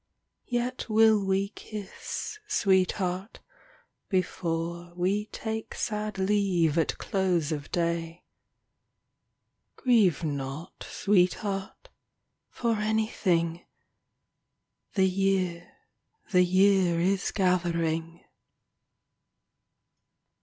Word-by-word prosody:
Yet 245 Hz, 0 st, -2 dB
will 220 Hz, -1 st, +5 dB
we 195 Hz, +1 st, +1 dB
kiss, 210 Hz, -, -7 dB
sweetheart, 190 Hz, -, +1 dB, 0.7 s
before 170 Hz, -2 st, -2 dB
We 195 Hz, +4 st, 0 dB
take 220 Hz, 0 st, -5 dB
sad 210 Hz, -1 st, -3 dB
leave 190 Hz, -5 st, +2 dB
at 160 Hz, -, 0 dB
close 180 Hz, -6 st, 0 dB
of 145 Hz, -2 st, -4 dB
day. 170 Hz, 0 st, -2 dB, 1.5 s
Grieve 215 Hz, -, +3 dB
not, 140 Hz, +1 st, -5 dB
sweetheart, 195 Hz, -, 0 dB, 0.6 s
for 230 Hz, -2 st, -1 dB
anything 195 Hz, -6 st, 0 dB, 0.6 s
— -, -, -51 dB
The 190 Hz, -1 st, +4 dB
year, 185 Hz, -2 st, 0 dB, 0.6 s
the 180 Hz, -2 st, +5 dB
year 185 Hz, -1 st, +4 dB
is 190 Hz, +3 st, +1 dB
gathering. 170 Hz, -3 st, 0 dB
190 Hz, 75 wpm, -28 LUFS, 170-210 Hz, 1.5 s, will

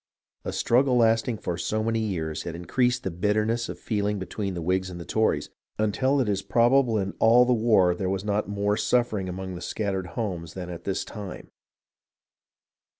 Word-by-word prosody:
A -, -, -3 dB
struggle 125 Hz, +1 st, +2 dB
lasting 115 Hz, 0 st, +3 dB
for 90 Hz, -3 st, -4 dB
so 110 Hz, +5 st, -1 dB
many 115 Hz, 0 st, 0 dB
years 85 Hz, -8 st, -2 dB
had 85 Hz, -, -5 dB
increased 125 Hz, +8 st, 0 dB
the 95 Hz, -, -2 dB
bitterness 105 Hz, +6 st, 0 dB
of -, -, -5 dB
the -, -, -25 dB
feel 105 Hz, -2 st, 0 dB
ing 105 Hz, 0 st, 0 dB
between 95 Hz, 0 st, -4 dB
the 85 Hz, -, -4 dB
Whigs 95 Hz, +2 st, 0 dB
and 85 Hz, -2 st, -8 dB
Tories, 110 Hz, 0 st, 0 dB, 0.3 s
until 120 Hz, +7 st, +1 dB
it 130 Hz, -, +1 dB
is 100 Hz, -2 st, 0 dB
probable 120 Hz, +1 st, +3 dB
in 95 Hz, -1 st, -2 dB
all 120 Hz, +2 st, +6 dB
the 125 Hz, -, +3 dB
war 110 Hz, -6 st, +4 dB
there 95 Hz, +1 st, -2 dB
was 95 Hz, +1 st, -2 dB
not 105 Hz, 0 st, 0 dB
more 100 Hz, 0 st, 0 dB
suffering 110 Hz, -5 st, +1 dB
among 95 Hz, +1 st, -5 dB
the 90 Hz, -, -7 dB
scat 100 Hz, 0 st, -2 dB
tered 95 Hz, -2 st, -3 dB
homes 90 Hz, -8 st, -3 dB
than 90 Hz, -1 st, -6 dB
at 85 Hz, -1 st, -8 dB
this 95 Hz, -, -2 dB
time. 105 Hz, -4 st, -8 dB
105 Hz, 195 wpm, -26 LUFS, 95-115 Hz, 0.3 s, all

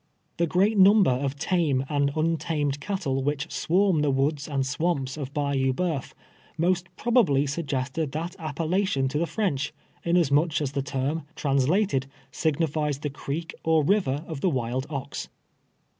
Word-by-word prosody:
The 170 Hz, -, +2 dB
great 195 Hz, +5 st, +2 dB
number 195 Hz, -4 st, +7 dB
of 135 Hz, +2 st, -1 dB
tame 145 Hz, -5 st, +1 dB
and 145 Hz, -1 st, +1 dB
nntamed 155 Hz, -3 st, 0 dB
cattle 160 Hz, -9 st, -2 dB
which 140 Hz, +1 st, -2 dB
swarm 185 Hz, -2 st, +2 dB
the 150 Hz, -, +2 dB
woods 140 Hz, +2 st, 0 dB
and 140 Hz, -3 st, -1 dB
swamps 135 Hz, 0 st, -1 dB
of 140 Hz, -3 st, -5 dB
Bayou 140 Hz, -3 st, 0 dB
Boeuf, 160 Hz, -3 st, -2 dB, 0.4 s
most 175 Hz, +2 st, +1 dB
probaldy 190 Hz, -, +3 dB
suggested 140 Hz, 0 st, -2 dB
that 165 Hz, +4 st, -4 dB
appellation 160 Hz, 0 st, 0 dB
to 150 Hz, +3 st, -1 dB
the 170 Hz, -, 0 dB
French, 150 Hz, -6 st, -1 dB, 0.3 s
inasmuch 165 Hz, -2 st, +3 dB
as 145 Hz, -3 st, -2 dB
the 140 Hz, -1 st, -1 dB
term, 140 Hz, +3 st, -2 dB
translated, 140 Hz, +2 st, +1 dB, 0.2 s
signifies 150 Hz, 0 st, 0 dB
the 145 Hz, 0 st, -4 dB
creek 150 Hz, +4 st, -5 dB
or 160 Hz, -1 st, +3 dB
river 150 Hz, -5 st, +1 dB
of 155 Hz, -4 st, -6 dB
the 185 Hz, -, +3 dB
wild 130 Hz, -1 st, -2 dB
ox. 140 Hz, -2 st, -5 dB
150 Hz, 145 wpm, -26 LUFS, 135-170 Hz, 0.4 s, number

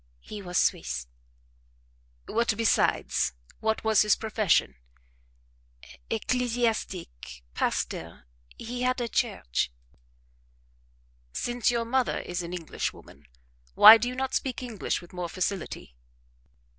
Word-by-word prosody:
"He 205 Hz, -, -9 dB
was 180 Hz, -2 st, -3 dB
Swiss." 65 Hz, -1 st, 0 dB, 1.2 s
"What 230 Hz, -1 st, 0 dB
besides? 70 Hz, -, +2 dB, 0.3 s
What 220 Hz, 0 st, -1 dB
was 220 Hz, -1 st, +4 dB
his 210 Hz, -1 st, +4 dB
profession?" 210 Hz, -, +1 dB, 1.3 s
"Ecclesiastic 220 Hz, -, -2 dB
pastor 80 Hz, -6 st, -3 dB, 0.3 s
he 245 Hz, +2 st, -5 dB
had 255 Hz, 0 st, +1 dB
a 240 Hz, -, -1 dB
church." -, -, -1 dB, 1.6 s
"Since 240 Hz, -, 0 dB
your 235 Hz, -1 st, 0 dB
mother 255 Hz, +2 st, +1 dB
is 175 Hz, 0 st, -4 dB
an 170 Hz, 0 st, -6 dB
Englishwoman, 160 Hz, -, -6 dB, 0.5 s
why 220 Hz, +2 st, +11 dB
do 240 Hz, -, -1 dB
you 250 Hz, -, -4 dB
not 265 Hz, 0 st, -2 dB
speak 260 Hz, -1 st, -2 dB
English 225 Hz, -7 st, -3 dB
with 175 Hz, -, -15 dB
more 180 Hz, -1 st, -4 dB
facility?" 185 Hz, -, -4 dB
215 Hz, 105 wpm, -27 LUFS, 170-240 Hz, 1.6 s, why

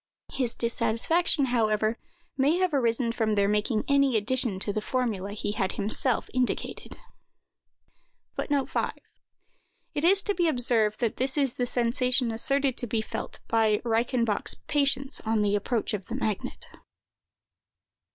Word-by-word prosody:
His 250 Hz, -4 st, -1 dB
dissatisfaction, 240 Hz, -, +1 dB
however, 215 Hz, -1 st, +1 dB, 0.4 s
may 285 Hz, +5 st, +2 dB
have 365 Hz, -3 st, +1 dB
arisen 235 Hz, -3 st, +1 dB
from 220 Hz, -2 st, 0 dB
their 200 Hz, -1 st, +3 dB
making 210 Hz, +2 st, +1 dB
any 275 Hz, -4 st, +3 dB
addition 235 Hz, -1 st, +1 dB
to 205 Hz, -, -1 dB
the 215 Hz, -, -2 dB
formula 210 Hz, -5 st, -2 dB
he 205 Hz, 0 st, -3 dB
had 195 Hz, -3 st, -1 dB
himself 220 Hz, +4 st, 0 dB
indicated. 255 Hz, -1 st, -2 dB, 1.4 s
It -, -, -3 dB, 1.5 s
is 390 Hz, +4 st, +4 dB
to 410 Hz, -, 0 dB
be 345 Hz, -3 st, +1 dB
observed 235 Hz, -6 st, +2 dB
that 230 Hz, -3 st, 0 dB
this 265 Hz, +3 st, -1 dB
is 275 Hz, -4 st, +1 dB
the 245 Hz, -, -2 dB
sensation 250 Hz, +1 st, +1 dB
asserted 275 Hz, +3 st, 0 dB
to 240 Hz, -, -3 dB
be 220 Hz, 0 st, 0 dB
felt -, -, -6 dB
by 220 Hz, -2 st, +2 dB
Reichenbach's 230 Hz, -1 st, 0 dB
patients 275 Hz, -1 st, +1 dB
on 220 Hz, -1 st, +1 dB
the 205 Hz, 0 st, +2 dB
approach 220 Hz, +2 st, -1 dB
of 200 Hz, -2 st, -4 dB
the 230 Hz, -, -4 dB
magnet. 215 Hz, -6 st, -3 dB
235 Hz, 135 wpm, -27 LUFS, 215-265 Hz, 1.5 s, is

